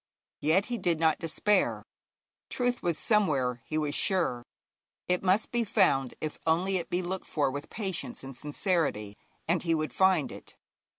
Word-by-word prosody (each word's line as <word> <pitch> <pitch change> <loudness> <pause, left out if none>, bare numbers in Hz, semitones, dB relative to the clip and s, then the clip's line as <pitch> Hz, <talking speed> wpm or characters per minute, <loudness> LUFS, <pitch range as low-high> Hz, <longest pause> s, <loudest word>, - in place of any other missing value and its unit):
Yet 165 +7 +2
he 240 -2 -3
did 170 -3 +1
not 160 -1 +3
despair. 185 +5 +1 0.7
Truth 245 -1 0
was 170 -3 0
somewhere, 140 - +2
he 155 - -2
was 150 -2 -1
sure; 170 - +1 0.7
it 180 0 +1
must 195 +3 +2
be 240 -1 +1
found 185 - +2
if 155 -1 -5
only 185 +4 +2
it 170 -2 -5
be 180 +1 -1
looked 185 +2 -4
for 145 -4 0
with 145 +2 -6
patience 200 - -4
and 135 -1 -8
sincerity, 145 - -1 0.3
and 170 +1 +2
he 165 -1 +1
would 155 -1 -2
find 190 -6 +3
it. - - -12
170 Hz, 165 wpm, -29 LUFS, 150-190 Hz, 0.7 s, not